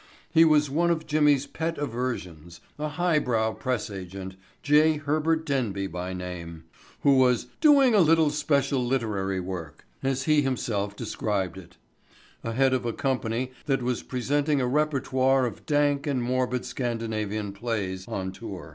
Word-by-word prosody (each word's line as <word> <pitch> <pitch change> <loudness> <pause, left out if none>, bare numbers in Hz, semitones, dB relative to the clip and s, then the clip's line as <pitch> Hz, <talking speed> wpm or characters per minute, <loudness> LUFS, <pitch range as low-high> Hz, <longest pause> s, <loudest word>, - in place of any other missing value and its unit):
He 165 0 +6
was 150 -2 +4
one 165 +5 +1
of 160 -2 0
Jimmy's 150 -2 +3
pet 165 +1 -3
aversions, 105 - -4 0.2
a 155 - -1
highbrow 150 -9 +1
press 125 -5 -3
agent—J. 95 - 0
Herbert 155 +2 0
Denby 115 -10 -1
by 90 0 -5
name—who 90 - -3
was 125 -2 +3
"doing 280 -5 +6
a 210 - +5
little 160 -3 +4
special 145 -3 +1
literary 105 -7 -1
work," 90 -4 -7 0.2
as 135 0 -1
he 150 +1 +4
himself 110 -7 -2
described 105 -5 -2
it, 90 - -15 0.7
ahead 130 +3 +2
of 130 - 0
a 120 -1 -2
company 130 -2 -1 0.2
that 135 -3 +1
was 125 -1 -1
presenting 145 +3 0
a 130 - +1
repertoire 135 -2 +2
of 120 - -6
dank 145 -1 +2
and 130 -4 0
morbid 125 0 -1
Scandinavian 110 -4 -3
plays 100 -4 -3
on 95 0 -3
tour. 95 -5 -8
125 Hz, 140 wpm, -26 LUFS, 100-145 Hz, 0.7 s, He